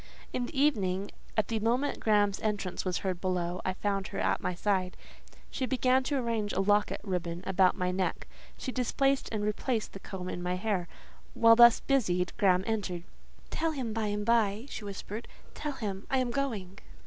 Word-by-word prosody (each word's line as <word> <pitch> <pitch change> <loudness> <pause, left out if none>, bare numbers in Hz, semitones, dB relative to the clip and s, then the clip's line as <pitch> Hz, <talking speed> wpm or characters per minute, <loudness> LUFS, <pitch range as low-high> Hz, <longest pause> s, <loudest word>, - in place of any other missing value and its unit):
In 245 -1 -1
the 270 - -4
evening, 200 -9 +1 0.3
at 215 - +2
the 225 -1 0
moment 245 +6 0
Graham's 205 -2 +2
entrance 205 -4 -2
was 185 -2 -1
heard 185 -2 -1
below, 180 -1 -1
I 185 - -1
found 195 -1 -1
her - - -7
at - - +1
my 180 - -2
side. 185 -1 0 0.5
She 260 - -2
began 260 0 +3
to 285 - 0
arrange 230 -4 -1
a - - 0
locket 205 +1 +2
ribbon 175 -3 -3
about 190 -1 +3
my 180 -1 0
neck, 185 0 -2 0.3
she 260 - -4
displaced 270 +2 +1
and 215 -2 -2
replaced 215 +2 -1
the 195 - -8
comb 185 -1 -6
in 175 - -4
my 180 +1 -1
hair; 185 -2 -1 0.5
while 230 0 +7
thus 235 0 +8
busied, 180 -10 +1
Graham 185 -2 +4
entered. 195 -6 -2 0.5
"Tell 325 -1 0
him 250 -6 -3
by 220 -1 -1
and 205 0 -2
by," 225 -1 +2
she - - -6
whispered; 205 +2 -6 0.3
"tell 295 -1 -4
him 200 -6 -5
I 265 - +2
am 255 -2 0
going." 215 -8 -3
205 Hz, 185 wpm, -30 LUFS, 185-235 Hz, 0.5 s, thus